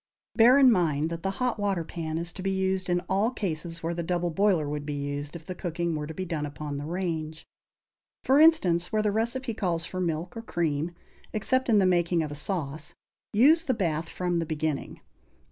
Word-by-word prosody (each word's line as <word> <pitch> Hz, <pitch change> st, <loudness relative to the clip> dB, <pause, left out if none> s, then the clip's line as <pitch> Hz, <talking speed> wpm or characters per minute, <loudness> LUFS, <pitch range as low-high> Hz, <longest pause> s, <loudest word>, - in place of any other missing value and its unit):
Bear 245 Hz, +3 st, +7 dB
in 265 Hz, -3 st, +7 dB
mind 160 Hz, -5 st, +1 dB
that 165 Hz, 0 st, -4 dB
the 195 Hz, -, -1 dB
hot 250 Hz, -3 st, 0 dB
water 195 Hz, -4 st, 0 dB
pan 160 Hz, -1 st, -4 dB
is 170 Hz, +1 st, -4 dB
to -, -, -7 dB
be 195 Hz, -, -1 dB
used 190 Hz, -1 st, 0 dB
in 175 Hz, 0 st, +2 dB
all 195 Hz, +5 st, +1 dB
cases 165 Hz, -7 st, -4 dB
where 165 Hz, +1 st, -1 dB
the 170 Hz, -, -3 dB
double 175 Hz, 0 st, -1 dB
boiler 185 Hz, -4 st, +2 dB
would 145 Hz, 0 st, -3 dB
be 145 Hz, 0 st, -4 dB
used, 145 Hz, +1 st, -4 dB
if 165 Hz, -2 st, -9 dB
the 185 Hz, -, -5 dB
cooking 170 Hz, -2 st, -2 dB
were 150 Hz, -1 st, -3 dB
to 160 Hz, -, -6 dB
be 185 Hz, -, -3 dB
done 165 Hz, -4 st, -3 dB
upon 145 Hz, 0 st, -5 dB
the 145 Hz, +1 st, -5 dB
range. 160 Hz, -3 st, -3 dB, 0.8 s
For 270 Hz, +2 st, +4 dB
instance, 185 Hz, -, +4 dB
where 215 Hz, -1 st, +1 dB
the 210 Hz, -, +2 dB
recipe 235 Hz, +3 st, -1 dB
calls 175 Hz, -6 st, -1 dB
for 185 Hz, +1 st, -4 dB
milk 170 Hz, +2 st, -2 dB
or 230 Hz, -, -5 dB
cream, 170 Hz, -5 st, -2 dB, 0.4 s
except 260 Hz, +4 st, 0 dB
in 220 Hz, -, +5 dB
the 195 Hz, -, +4 dB
making 175 Hz, -2 st, +2 dB
of 150 Hz, -, -5 dB
a -, -, -4 dB
sauce, 150 Hz, -1 st, -4 dB, 0.4 s
use 290 Hz, +10 st, +5 dB
the 265 Hz, -7 st, -1 dB
bath 165 Hz, -5 st, -1 dB
from 175 Hz, -1 st, -1 dB
the 165 Hz, -, -1 dB
beginning. 155 Hz, -2 st, -3 dB
175 Hz, 215 wpm, -27 LUFS, 160-200 Hz, 0.8 s, Bear